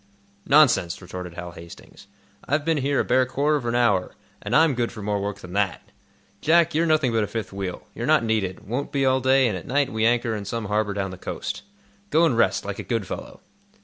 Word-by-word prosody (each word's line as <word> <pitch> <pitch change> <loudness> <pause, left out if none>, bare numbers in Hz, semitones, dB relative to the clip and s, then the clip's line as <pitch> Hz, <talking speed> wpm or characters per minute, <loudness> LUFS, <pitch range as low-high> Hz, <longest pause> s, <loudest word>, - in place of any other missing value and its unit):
"Nonsense," 135 - +4
retorted 90 -1 -8
Hal 90 0 -7
Hastings. 85 +3 -13 0.4
"I've 145 +2 0
been 165 -1 +2
here 140 0 0
a - - +3
bare 130 0 +3
quarter 140 +4 +1
of 125 -4 -5
an 120 - 0
hour, 105 -7 +2 0.3
and - - -2
I'm 160 -2 +5
good 120 -1 -1
for 110 -3 -8
more 105 0 -1
work 100 0 -4
than 90 0 -10
that. 100 -3 -1 0.5
Jack, 170 +1 +4
you're 165 +2 +2
nothing 155 -6 +2
but 110 -1 +1
a - - -2
fifth 110 -2 -5
wheel. 95 -2 -5
You're - - -4
not - - +4
needed; 105 -5 -2
won't 125 +6 -3
be 135 -1 +1
all 130 0 +3
day, 130 0 +4
and 105 - -1
at 90 - -8
night 140 0 +1
we 110 0 -1
anchor 115 0 +2
in 105 -1 -5
some 115 +2 -3
harbor 105 0 0
down 95 -2 -2
the 95 - -10
coast. - - -5 0.5
Go 160 +2 +4
and 135 - +2
rest, 115 - +2
like 100 0 -5
a - - -4
good 115 -4 -2
fellow." - - -8
115 Hz, 230 wpm, -24 LUFS, 100-135 Hz, 0.5 s, I'm